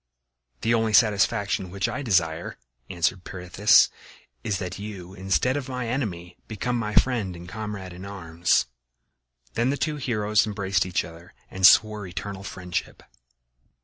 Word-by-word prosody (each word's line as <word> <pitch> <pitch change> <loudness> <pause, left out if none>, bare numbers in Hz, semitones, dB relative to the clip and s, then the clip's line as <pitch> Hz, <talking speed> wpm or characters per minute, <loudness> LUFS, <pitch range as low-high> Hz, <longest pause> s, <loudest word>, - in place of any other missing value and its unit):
"The 115 - +2
only 110 -1 +1
satisfaction 100 -3 +3
which 100 +4 -1
I 125 +4 -3
desire," 85 - 0 0.3
answered 85 +2 0
Pirithous, 95 +3 +4 0.6
"is 100 - -1
that 90 -1 -5
you 95 -3 -8
instead 95 +7 +1
of 140 -2 -4
my 125 -2 -3
enemy 90 -9 -3
become 120 +3 -2
my 105 -3 -2
friend 110 -8 +2
and 85 +1 -10
comrade 105 -2 -6
in 90 +2 -10
arms." 85 -5 0 0.9
Then 120 +2 +1
the 140 - 0
two 150 +2 -1
heroes 110 -5 +1
embraced 100 -2 0
each 90 - 0
other 85 +1 -13 0.2
and 95 -1 +6
swore 105 -1 +4
eternal 95 +2 -6
friendship. 90 -4 -5
100 Hz, 145 wpm, -25 LUFS, 90-110 Hz, 0.9 s, and